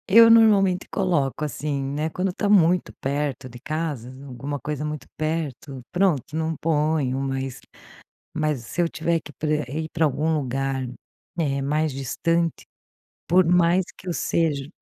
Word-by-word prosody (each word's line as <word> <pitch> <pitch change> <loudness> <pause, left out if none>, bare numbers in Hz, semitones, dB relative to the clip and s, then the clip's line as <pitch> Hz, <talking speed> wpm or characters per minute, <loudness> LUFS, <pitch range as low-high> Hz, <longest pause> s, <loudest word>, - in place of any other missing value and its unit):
Eu 230 +3 +8
normalmente 205 -5 +5
coloco, 155 -6 0
assim, 145 -1 -3
né, 145 +3 -2
quando 180 +3 -2
tá 205 - -1
muito 180 -3 +4
perto 140 -1 -2
de 120 -1 -11
casa, 150 -4 -3 0.2
alguma 140 +2 -5
coisa 150 0 -4
muito 150 -3 -5
perto, 150 -4 -3
pronto 175 -7 +1
não 160 0 -1
ponho, 150 -4 +1
mas 135 -1 -3 0.7
mas 150 -5 -1
se 175 - -2
eu 170 - +3
tiver 165 0 0
que 150 -1 -13
pra 150 +4 -3
rei 155 +5 -4
pra 165 -1 +2
algum 155 +3 +1
lugar, 135 -1 -2 0.5
eh, 140 -4 0
mais 150 +2 +1
distante, 165 +5 -1 0.6
por 185 +2 +5
mais 175 +1 +4
que - - -15
eu - - 0
seja 150 -5 0
155 Hz, 150 wpm, -24 LUFS, 135-170 Hz, 0.7 s, Eu